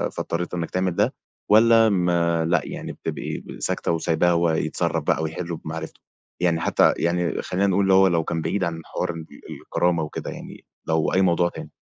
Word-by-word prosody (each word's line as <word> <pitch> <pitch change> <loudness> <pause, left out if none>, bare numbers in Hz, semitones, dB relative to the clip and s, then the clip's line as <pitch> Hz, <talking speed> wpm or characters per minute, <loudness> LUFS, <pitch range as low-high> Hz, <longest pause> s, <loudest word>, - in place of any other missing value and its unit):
فاضطريت 85 +2 -3
إنّك 85 -2 -3
تعمل 90 -1 0
ده، - - +2 0.4
والّا 115 +1 +6
ما 85 -3 +1
لأ 85 -1 +2
يعني - - -6
بتبقي - - -5
ب 65 -2 -10
ساكتة - - -1
وسايباه 85 +1 +1
هو 85 0 +2
يتصرّف 80 - -1
بقى 80 - +1
ويحلّه 85 +2 -4
بمعرفته؟ 80 +1 -7 0.4
يعني 85 -2 +1
حتى 80 - +3
يعني 85 0 0
خلّينا 95 +2 0
نقول 100 +1 +2
اللي 95 -1 +3
هو 95 0 +6
لو 85 -3 +1
كان 80 +1 -2
بعيد 90 +5 -1
عن 85 -2 -3
حوار - - -3
الب 80 -1 -8 0.3
الكرامة 85 -2 0
وكده 75 - -5
يعني - - -10 0.2
لو 80 -1 +1
أي 95 - +3
موضوع 85 -1 +3
تاني؟ - - -9
85 Hz, 190 wpm, -23 LUFS, 80-90 Hz, 0.4 s, والّا